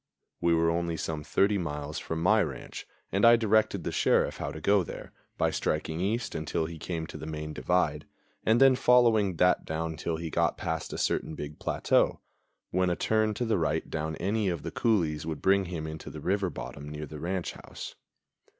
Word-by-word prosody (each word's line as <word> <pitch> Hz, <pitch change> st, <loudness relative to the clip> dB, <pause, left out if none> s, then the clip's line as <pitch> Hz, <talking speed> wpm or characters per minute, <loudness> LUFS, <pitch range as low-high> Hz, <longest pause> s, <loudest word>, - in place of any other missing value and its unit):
We 85 Hz, -1 st, +3 dB
were 80 Hz, 0 st, +3 dB
only 85 Hz, 0 st, -1 dB
some 80 Hz, -2 st, -3 dB
thirty 100 Hz, +5 st, +2 dB
miles 75 Hz, -3 st, -4 dB
from 80 Hz, 0 st, -4 dB
my 110 Hz, +4 st, +5 dB
ranch, 70 Hz, -8 st, -5 dB, 0.2 s
and 100 Hz, -, 0 dB
I 120 Hz, 0 st, +9 dB
directed 110 Hz, -4 st, +2 dB
the -, -, -2 dB
Sheriff -, -, +2 dB
how -, -, -3 dB
to 80 Hz, -, -7 dB
go 100 Hz, +4 st, +3 dB
there, -, -, -8 dB, 0.3 s
by -, -, +2 dB
striking 80 Hz, +1 st, -1 dB
east 110 Hz, +6 st, -1 dB
until 80 Hz, +1 st, -1 dB
he 80 Hz, 0 st, -7 dB
came 80 Hz, 0 st, -3 dB
to -, -, -8 dB
the 80 Hz, -, -7 dB
main 75 Hz, 0 st, -5 dB
divide, -, -, 0 dB, 0.4 s
and 110 Hz, +2 st, +4 dB
then 135 Hz, -1 st, +7 dB
following 115 Hz, -7 st, +4 dB
that 90 Hz, +2 st, +3 dB
down 80 Hz, 0 st, -3 dB
till 80 Hz, +2 st, -2 dB
he 80 Hz, -1 st, -5 dB
got -, -, +1 dB
past -, -, -3 dB
a -, -, -4 dB
certain 80 Hz, -, -1 dB
big 75 Hz, 0 st, -7 dB
plateau, -, -, +2 dB, 0.5 s
when 90 Hz, 0 st, +2 dB
a 90 Hz, -, +1 dB
turn 110 Hz, +1 st, +1 dB
to 120 Hz, -, -1 dB
the 110 Hz, -5 st, +1 dB
right 80 Hz, -1 st, -1 dB
down 80 Hz, 0 st, -2 dB
any 100 Hz, +3 st, 0 dB
of 85 Hz, -3 st, -3 dB
the -, -, -4 dB
coulees 80 Hz, -9 st, +1 dB
would 80 Hz, -3 st, -3 dB
bring 95 Hz, 0 st, +3 dB
him 85 Hz, -3 st, -4 dB
into 80 Hz, 0 st, -7 dB
the 80 Hz, -, -8 dB
river 95 Hz, +4 st, 0 dB
bottom 75 Hz, -3 st, -7 dB
near 75 Hz, 0 st, -5 dB
the 75 Hz, 0 st, -9 dB
ranch 90 Hz, +2 st, -2 dB
house. -, -, -9 dB
85 Hz, 205 wpm, -29 LUFS, 80-100 Hz, 0.5 s, I